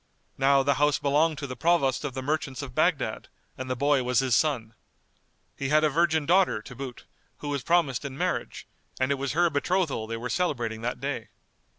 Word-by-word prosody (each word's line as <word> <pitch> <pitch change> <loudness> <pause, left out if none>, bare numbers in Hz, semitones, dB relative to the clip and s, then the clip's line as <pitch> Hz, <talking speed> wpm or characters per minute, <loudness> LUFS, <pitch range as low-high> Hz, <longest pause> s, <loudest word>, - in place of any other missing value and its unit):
Now 135 0 +4
the 140 +1 +3
house 150 -1 +4
belonged 150 +2 +2
to 145 - -4
the 130 -2 -6
Provost 145 -5 +2
of 140 -3 -4
the 130 - -4
Merchants 145 -2 -2
of 130 -3 -8
Baghdad, 155 -7 0 0.3
and 130 0 -6
the 130 - 0
boy 140 +1 +2
was 125 -1 0
his 130 -2 +3
son. 120 -8 0 0.8
He 135 - -3
had 155 +1 +4
a 155 - +4
virgin 160 0 +2
daughter, 180 - +3
to 115 +4 -11
boot, 130 -1 -8 0.3
who 145 - -6
was 140 -2 -1
promised 165 -5 +1
in 135 -1 -6
marriage, - - -2 0.3
and 130 +1 +1
it 140 - 0
was 140 0 -2
her 175 +3 +4
betrothal 145 -5 0
they 115 0 -4
were 120 +2 -4
celebrating 120 -6 -1
that 120 +2 -3
day. 120 -4 -4
140 Hz, 205 wpm, -27 LUFS, 125-155 Hz, 0.8 s, Now